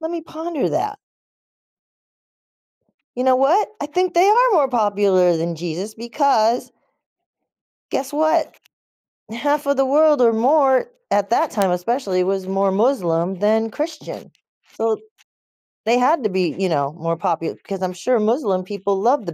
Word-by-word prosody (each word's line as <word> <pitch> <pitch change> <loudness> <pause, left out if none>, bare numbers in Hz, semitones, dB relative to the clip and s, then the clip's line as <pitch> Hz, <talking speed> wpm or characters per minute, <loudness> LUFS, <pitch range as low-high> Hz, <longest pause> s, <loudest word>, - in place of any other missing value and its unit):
"Let 320 +1 -4
me 335 -2 -5
ponder 320 -1 -4
that." 420 0 -2 2.2
You 250 - -1
know 260 -1 +4
what? 315 +11 +2
I 290 - -3
think 360 +4 -1
they 355 +3 +4
are 485 +3 +4
more 295 -8 +3
popular 200 -6 +2
than 165 0 -3
Jesus, 175 +6 -5
because 235 -1 +1 1.2
guess 270 +1 -3
what? 315 +1 0 0.8
Half 290 +5 -1
of 280 -1 0
the 270 - +3
world 295 0 +3
or 230 -1 +5
more, 265 - +2 0.2
at 205 0 0
that 315 +5 +2
time, 195 -4 0
especially, 185 0 -1
was 190 0 -2
more 195 0 0
Muslim 190 -6 0
than 220 +2 +1
Christian. 310 +1 -7 0.4
So, 225 0 0 0.9
they 240 +2 +3
had 270 +1 +2
to 215 - 0
be, 185 -4 -1
you 190 -1 0
know, 145 -3 -1
more 165 0 -3
popu 165 -2 -2
'cause 195 -1 -6
I'm 185 0 -2
sure 235 +6 0
Muslim 210 -4 0
people 200 0 -3
loved 240 0 +1
the 170 - -4
225 Hz, 150 wpm, -20 LUFS, 190-290 Hz, 2.2 s, or